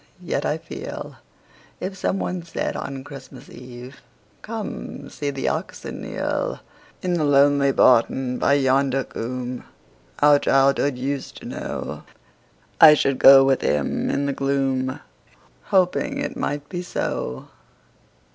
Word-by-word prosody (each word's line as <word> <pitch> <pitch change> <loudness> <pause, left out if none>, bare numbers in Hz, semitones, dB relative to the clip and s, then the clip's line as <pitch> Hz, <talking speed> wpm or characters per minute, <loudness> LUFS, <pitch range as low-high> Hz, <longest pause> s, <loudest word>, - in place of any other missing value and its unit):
Yet, - - -1
I - - 0
feel, - - -8 0.6
If 190 +1 -4
someone 185 -1 -2
said 170 0 -4
on 135 -1 -5
Christmas 135 -1 -11
Eve, 125 +1 -11 0.4
"Come; 215 -9 -7
see 145 - -3
the 135 -1 -3
oxen - - -5
kneel,"In 180 -1 -4
the 170 -3 +1
lonely 140 -1 +4
barton 125 0 +3
by 140 - +3
yonder 135 -1 +2
coomb 125 +1 -5 0.6
Our 145 0 +6
childhood 135 0 +2
used 135 +1 -4
to - - -11 1.3
know,"I 155 -2 +10
should 135 -2 0
go 135 0 +9
with 135 -1 +2
him 75 -1 0
in 140 +1 0
the 140 - -1
gloom, 135 -1 -1 0.7
Hoping 195 +9 +1
it 280 - -3
might 145 0 -3
be 175 -1 -5
so. 65 - -4
140 Hz, 120 wpm, -22 LUFS, 130-145 Hz, 1.3 s, know,"I